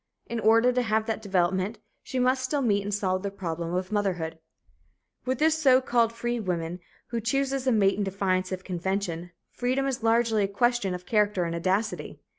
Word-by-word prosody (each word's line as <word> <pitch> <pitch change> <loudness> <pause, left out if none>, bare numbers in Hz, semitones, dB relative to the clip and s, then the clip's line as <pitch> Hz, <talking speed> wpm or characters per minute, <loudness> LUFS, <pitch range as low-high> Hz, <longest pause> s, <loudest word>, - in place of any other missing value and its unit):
In 235 - -4
order 230 +3 +5
to 250 - +2
have 220 -2 +1
that 225 -1 -2
development, 190 +2 0 0.2
she 260 - -5
must 255 +1 +2
still 275 +2 -1
meet 205 -4 +2
and 205 +1 -4
solve 185 -2 0
the 200 - -2
problem 170 -3 -4
of 185 +2 -2
motherhood. 180 -6 -1 0.9
With 260 0 +1
the 315 +4 +4
so 280 -5 +5
called 235 -3 +2
"free" 240 +1 -2
woman, 175 -3 -3 0.3
who 235 -1 -2
chooses 270 +3 0
a - - +5
mate 200 -3 +3
in - - +1
defiance 190 -1 -1
of 185 0 -4
convention, 180 -1 -3 0.2
freedom 255 +2 0
is 270 -3 -2
largely 225 -1 +3
a - - +1
question 205 -2 +1
of 180 0 -9
character 210 -4 +2
and 170 -1 -2
audacity. 190 +6 -1
210 Hz, 190 wpm, -27 LUFS, 185-240 Hz, 0.9 s, order